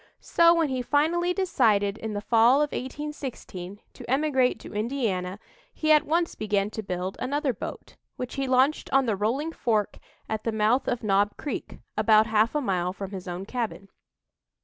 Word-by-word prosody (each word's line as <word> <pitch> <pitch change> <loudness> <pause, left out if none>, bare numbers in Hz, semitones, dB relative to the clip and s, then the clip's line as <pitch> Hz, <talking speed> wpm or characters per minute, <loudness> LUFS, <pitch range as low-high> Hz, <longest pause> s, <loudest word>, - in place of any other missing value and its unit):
So, 335 0 +4
when 325 -3 +1
he 260 -1 -1
finally 320 +7 +1
decided 225 - +2
in 220 -1 -4
the 205 - -3
fall 230 +3 +5
of 295 +1 +1
1816 255 -9 -6
to - - -11
emigrate 265 -2 +2
to - - -10
Indiana, 210 -5 -2 0.4
he 310 -1 +1
at 305 0 +5
once 335 +2 +1
began 205 -1 -1
to 220 - -4
build 185 -1 -4
another 280 +1 -1
boat, - - -8 0.2
which 250 -1 -5
he 275 -1 -2
launched 260 +4 +2
on 270 0 +4
the 220 -4 +1
Rolling 245 +11 -1
Fork, 220 -9 -1 0.3
at 220 -1 -3
the 230 - -1
mouth 220 +4 +2
of 240 - -1
Knob 205 0 +2
Creek, 285 -6 -5 0.2
about 215 0 +5
half 220 +3 +2
a 295 - +2
mile 180 -6 -1
from 195 0 -7
his 190 -2 -7
own 180 +2 -5
cabin. 220 -4 -4
235 Hz, 175 wpm, -26 LUFS, 205-285 Hz, 0.4 s, fall